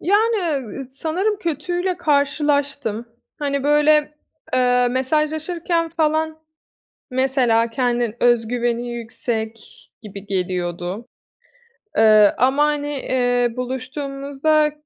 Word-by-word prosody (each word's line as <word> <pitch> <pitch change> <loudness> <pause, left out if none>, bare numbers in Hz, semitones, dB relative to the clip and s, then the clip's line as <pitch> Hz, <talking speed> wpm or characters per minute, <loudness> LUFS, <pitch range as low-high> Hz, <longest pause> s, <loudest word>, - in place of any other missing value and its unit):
Yani, 435 +5 +3 0.3
ııı, 265 +5 -7
sanırım 340 +10 -1
kötüyle 350 +2 -2
karşılaştım. 285 -6 0 0.3
Hani, 280 -2 -1
böyle, 300 +1 +3 0.4
eee, 250 -1 +3
mesajlaşırken 315 +5 0
falan, 315 -1 0 0.7
mesela, 250 -3 +2
kendi 240 -2 0
öz 240 -2 +3
güveni 240 0 -1
yüksek 225 -1 -5
gibi 200 -2 -10
geliyordu. 180 +2 -3 0.9
Eee, 215 -2 +6
ama, 265 +5 +3
hani, 295 -1 -1
eee, 245 -3 0
buluştuğumuzda 275 +4 -1
265 Hz, 90 wpm, -21 LUFS, 235-305 Hz, 0.9 s, Eee